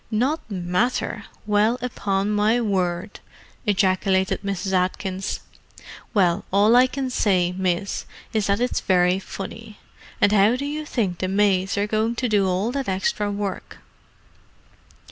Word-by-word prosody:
"Not 255 +6 -1
matter! 195 +3 -1 0.2
Well, 210 +3 +2
upon 200 -5 -1
my 210 +3 +2
word!" 185 -3 -1 0.5
ejaculated 190 -1 +2
Mrs. 195 -1 -3
Atkins. 190 +1 -1 0.7
"Well, 185 -2 +2
all 205 +4 +5
I 250 +1 +6
can 260 0 -3
say, 185 -7 +2
miss, 185 +1 -2 0.3
is 215 -2 +1
that 200 +1 +1
it's 245 +1 0
very 180 0 +3
funny. 210 +3 -8 0.4
And 205 - +4
how 210 +3 +4
do 275 +3 -3
you 300 +1 -4
think 195 -11 -1
the 185 - -1
maids 195 -1 +1
are 200 - +2
going 220 +2 0
to 250 +1 -1
do 205 -4 +2
all 190 +5 0
that 275 -4 -3
extra 195 +2 0
work?" 200 -1 -4
205 Hz, 140 wpm, -23 LUFS, 190-225 Hz, 0.7 s, I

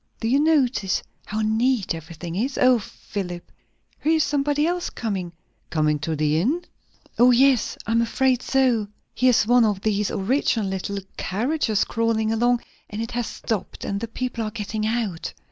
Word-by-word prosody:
Do 225 - -2
you 265 +4 +3
notice 270 -10 +2 0.2
how 215 +1 -2
neat 220 0 +1
everything 165 +1 -7
is? 255 +8 -1
O 255 -1 +5
Philip! 180 -3 -7 0.5
here 315 - +2
is 315 -2 +3
somebody 290 +1 +1
else 350 +1 -1
coming!" 195 -6 -3 0.4
"Coming 150 -2 +1
to 155 +2 -2
the 155 +1 +1
inn?" 320 - 0 0.5
"Yes. 250 +1 +4
O, - - -3
I'm 230 +1 +3
afraid 255 +1 +1
so. 255 -6 +2 0.3
Here's 250 -4 +3
one 245 +1 +5
of 205 -3 +1
these 210 -1 0
original 220 0 0
little 190 +1 -3 0.2
carriages 225 - 0
crawling 230 -1 0
along, 240 +2 +2 0.3
and 210 - -6
it 230 0 -3
has 240 -2 -2
stopped, 210 -5 -4
and 200 - -2
the 230 - -4
people 245 0 -3
are 215 - -2
getting 215 0 -3
out. 220 -7 -2
225 Hz, 160 wpm, -23 LUFS, 200-255 Hz, 0.5 s, O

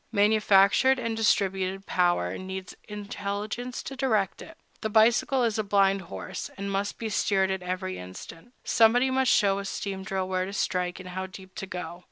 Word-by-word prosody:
Manufactured 210 +4 +4
and 230 -3 -2
distributed 195 -3 +1
power 175 - +1
needs 190 0 -7
intelligence 210 +4 -5
to 270 - -6
direct 220 -8 0
it: 325 +1 -12 0.2
the 220 - -1
bicycle 235 +4 +4
is 225 -2 0
a - - +1
blind 195 -1 +3
horse, 95 - -6
and 200 0 -4
must 200 +1 -2
be 225 - -4
steered 195 -2 +1
at 190 -1 -2
every 185 +1 -4
instant; 165 - -10
somebody 245 +3 +4
must 260 -1 +2
show 200 -1 +3
a 200 - -5
steam 195 0 -4
drill 190 0 -2
where 185 0 -1
to 195 - -7
strike 180 -3 -1
and 185 0 -9
how 190 +1 -4
deep 190 0 -12
to 195 -3 -6
go. 175 -2 -6
195 Hz, 180 wpm, -27 LUFS, 185-220 Hz, 0.2 s, Manufactured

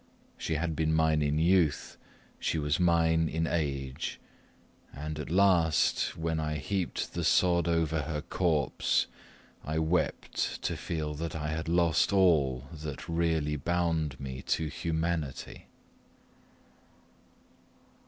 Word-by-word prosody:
She 80 - -3
had 80 0 -1
been 80 0 +1
mine 80 -1 +3
in 75 0 +1
youth, 85 -1 +2 0.4
she - - -1
was 75 +1 0
mine 80 -2 +3
in 80 +1 -1
age, 70 -5 -2 0.7
and 75 +2 -6
at 75 - -5
last, 90 -3 +3
when 80 0 -1
I 75 0 -2
heaped 90 +4 -2
the - - -2
sod 85 -2 +3
over 80 -2 +1
her 75 +1 -3
corpse, 80 -5 +1 0.6
I 75 +1 -3
wept 80 +3 -1
to - - -1
feel 75 -2 -3
that 80 +2 -4
I 75 -1 -3
had 80 +1 -3
lost 85 0 +3
all 75 -10 +3
that 75 -3 -7
really 80 -3 0
bound 80 -3 -1
me 65 -1 -6
to 80 -1 0
humanity. 80 -3 -3
80 Hz, 125 wpm, -30 LUFS, 75-85 Hz, 0.7 s, mine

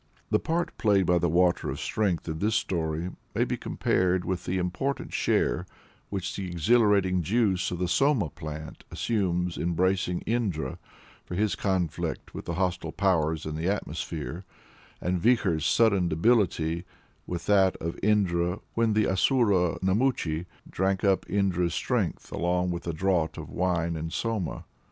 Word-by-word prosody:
The - - +4
part 170 +1 -1
played 100 -3 +3
by 90 0 +3
the 85 0 +1
Water 90 +2 +2
of - - -4
Strength 95 -7 -1
in 80 -1 -3
this 110 +4 +1
story 80 0 -1 0.2
may - - +3
be - - -1
compared 90 0 0
with 95 -2 -2
"the 95 - -1
important 90 +10 -2
share - - +1 0.4
which 95 -3 -3
the 95 -2 -4
exhilarating 95 0 +3
juice 95 -1 +1
of 90 - -3
the 90 +1 -1
Soma 130 - +2
plant 75 -1 -8
assumes 90 -6 -1
in 85 +1 0
bracing 90 0 +1
Indra 100 - -2 0.4
for 90 - -6
his 105 +2 +1
conflict 90 -5 -2
with - - -7
the 85 - -3
hostile 90 -2 -1
powers 80 -5 +1
in 75 0 -4
the 80 +3 -2
atmosphere," 85 -2 -4 0.6
and 90 -1 -1
Vikhor's 95 -9 +2
sudden 100 -6 +3
debility 85 -3 +2 0.4
with 85 -1 -4
that 95 -2 +4
of 85 +1 -5
Indra 90 -3 +2
when 115 -1 +2
the 105 0 +3
Asura 95 - +2
Namuchi 95 -5 +1 0.2
"drank 95 +1 0
up 100 -2 +2
Indra's 90 -4 +1
strength - - -1
along 90 +1 0
with 85 0 -5
a 85 - -1
draught 85 -2 0
of - - -7
wine 85 -2 0
and 80 +1 -4
soma." 110 -1 -2
90 Hz, 155 wpm, -27 LUFS, 85-100 Hz, 0.6 s, The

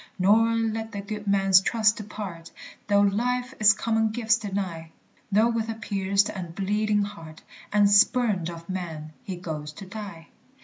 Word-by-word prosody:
Nor 225 +5 +4
let 225 0 -2
the 200 - -4
good 210 0 -7
man's 195 -1 +5
trust 220 +1 +2
depart, 200 -6 -7 0.4
Though 200 -1 +4
life 245 +5 0
its 215 0 +7
common 220 +1 0
gifts 225 +1 +1
deny, 190 -6 -4 0.4
Though 215 +4 +4
with 230 -1 -2
a 225 - -3
pierced 200 -2 0
and 175 -4 -7
bleeding 210 +2 0
heart, 165 -6 -9 0.3
And 205 0 +4
spurned 205 -3 +3
of 170 -1 -9
men, 160 -5 -6
he 200 -7 -6
goes 155 -4 -6
to 195 - -10
die. 190 -4 -9
205 Hz, 160 wpm, -25 LUFS, 185-220 Hz, 0.4 s, its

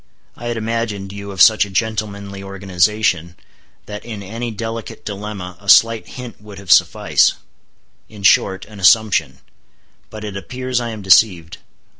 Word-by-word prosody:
I 120 - -8
had 120 -1 -2
imagined 110 -3 -3
you 100 0 -8
of 95 -2 +4
such 110 -1 +6
a 100 - -7
gentlemanly 100 -1 -3
organization, 95 -2 0 0.5
that 105 0 -8
in 110 -4 -7
any 115 +5 -5
delicate 115 +1 -6
dilemma 100 -3 -6
a 100 0 -8
slight 115 +1 +5
hint 125 -4 -9
would 105 -2 -12
have 100 -3 -5
suffice—in 105 +4 0
short, 95 -1 +3
an 105 -1 -13
assumption. 110 +2 +3 0.7
But 110 0 -9
it 105 -2 -6
appears 125 +5 -3
I 120 - -4
am 110 -3 -7
deceived. 90 -4 +3
105 Hz, 145 wpm, -18 LUFS, 95-110 Hz, 0.7 s, such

